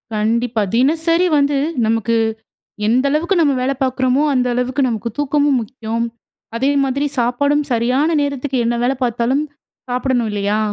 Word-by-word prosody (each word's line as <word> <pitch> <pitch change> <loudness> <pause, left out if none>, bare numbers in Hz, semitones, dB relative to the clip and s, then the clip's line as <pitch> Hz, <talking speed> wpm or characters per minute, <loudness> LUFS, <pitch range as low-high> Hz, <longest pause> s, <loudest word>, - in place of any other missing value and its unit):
கண்டிப்பா. 230 +1 0
தினசரி 325 +7 +2
வந்து 285 0 +2 0.3
நமக்கு 225 +1 +1 0.7
எந்த 255 +4 +2
அளவுக்கு 340 +6 +1
நமக்கு 280 -5 +2
வேல 270 +1 +1
பார்க்குறோமோ, 260 +2 +1
அந்த 250 -1 +1
அளவுக்கு 250 +3 -1
நமக்கு 230 0 -3
தூக்கமும் 290 -2 +2
முக்கியம். 230 0 -4 0.5
அதே 270 +4 +1
மாதிரி 275 +2 -1
சாப்பாடும் 285 +5 +1
சரியான 250 +7 +1
நேரத்துக்கு 280 -1 -2
என்ன 240 - +1
வேல 260 +2 +2
பார்த்தாலும் 245 +4 0 0.5
சாப்படணும் 245 -2 0
இல்லையா? 205 +1 0
255 Hz, 135 wpm, -18 LUFS, 235-285 Hz, 0.7 s, தினசரி